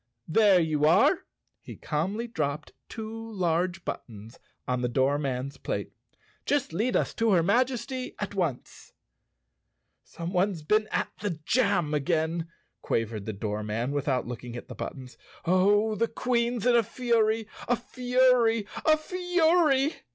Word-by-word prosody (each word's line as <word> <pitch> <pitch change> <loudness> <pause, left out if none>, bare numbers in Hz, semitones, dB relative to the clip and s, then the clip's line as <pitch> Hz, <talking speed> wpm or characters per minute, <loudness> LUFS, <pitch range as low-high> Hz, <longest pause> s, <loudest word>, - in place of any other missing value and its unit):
"There 200 +2 +5
you 155 -3 +1
are." 280 - +4 0.3
He - - -10
calmly 190 +10 -2
dropped 150 -9 -3 0.2
two 225 0 -7
large 175 -1 0
but¬ - - -2
tons 110 0 -12 0.3
on 125 -1 0
the 125 - 0
doorman's 135 +1 0
plate. - - -4 0.5
"Just 285 - 0
lead 225 +9 0
us - - +1
to 225 -2 +2
her 170 -3 +4
Maj¬ 240 +8 +3
esty 255 +1 -5
at 205 -1 -4
once." 170 -10 -4 1.1
"Someone's 180 0 -2
been 215 +7 +2
at - - 0
the 195 -6 -3
jam 200 -11 +2
again," 160 +2 0 0.3
quavered 110 -2 -2
the - - -1
doorman 105 +4 -3
without 140 -3 0
looking 120 0 -7
at 120 - -8
the - - -6
buttons. 130 -2 -8 0.3
"Oh, 205 +5 +3
the 230 +2 +1
Queen's 235 -1 -1
in 245 -1 +5
a 235 - +6
fury—a 225 0 0
fury— 245 -2 +2 0.2
a 310 0 +5
fury!" 330 -4 +2
195 Hz, 135 wpm, -27 LUFS, 145-235 Hz, 1.1 s, a